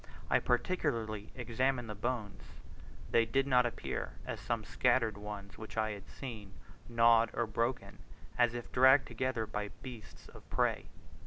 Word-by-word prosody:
I -, -, +5 dB
particularly 115 Hz, -, -1 dB
examined 125 Hz, 0 st, 0 dB
the 105 Hz, -, -4 dB
bones; 110 Hz, -1 st, -3 dB, 0.7 s
they 115 Hz, -, +5 dB
did 135 Hz, +4 st, +1 dB
not 125 Hz, -3 st, +4 dB
appear, 120 Hz, -, -4 dB
as -, -, -4 dB
some 115 Hz, -2 st, -2 dB
scattered 120 Hz, -2 st, +2 dB
ones 100 Hz, -1 st, -8 dB
which 110 Hz, 0 st, -9 dB
I 110 Hz, 0 st, +1 dB
had 100 Hz, -2 st, -8 dB
seen, 110 Hz, -8 st, -8 dB, 0.3 s
gnawed 115 Hz, -1 st, +5 dB
or 120 Hz, -, 0 dB
broken, 110 Hz, -3 st, -2 dB, 0.4 s
as 120 Hz, -1 st, +3 dB
if 120 Hz, -, -6 dB
dragged 130 Hz, +2 st, +6 dB
together 130 Hz, -3 st, -1 dB
by 105 Hz, -1 st, -3 dB, 0.2 s
beasts 120 Hz, -5 st, -10 dB
of -, -, -15 dB
prey. -, -, +1 dB
115 Hz, 150 wpm, -33 LUFS, 110-125 Hz, 0.7 s, dragged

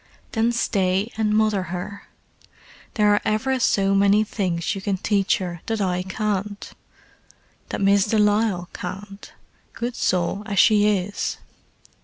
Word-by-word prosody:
"Then 225 Hz, +1 st, +1 dB
stay 195 Hz, -2 st, 0 dB
and 215 Hz, -1 st, 0 dB
mother 215 Hz, -3 st, +2 dB
her. 185 Hz, +3 st, -6 dB, 0.9 s
There 210 Hz, -2 st, +4 dB
are 205 Hz, -, +2 dB
ever 255 Hz, +5 st, 0 dB
so 195 Hz, -4 st, +2 dB
many 200 Hz, +2 st, +4 dB
things 185 Hz, -3 st, -2 dB
you 195 Hz, -, -6 dB
can 195 Hz, -1 st, -1 dB
teach 200 Hz, 0 st, +1 dB
her 175 Hz, -3 st, -5 dB
that 225 Hz, -1 st, -1 dB
I 180 Hz, -2 st, 0 dB
can't: 205 Hz, +1 st, -3 dB, 1.0 s
that -, -, -4 dB
Miss 200 Hz, 0 st, +4 dB
de 220 Hz, -, +1 dB
Lisle 210 Hz, -3 st, +2 dB
can't, 195 Hz, +2 st, -8 dB, 0.4 s
good 240 Hz, +1 st, -4 dB
soul 180 Hz, +2 st, 0 dB
as 200 Hz, -2 st, -3 dB
she 210 Hz, 0 st, +5 dB
is. 195 Hz, +2 st, -3 dB
200 Hz, 140 wpm, -23 LUFS, 190-215 Hz, 1.0 s, she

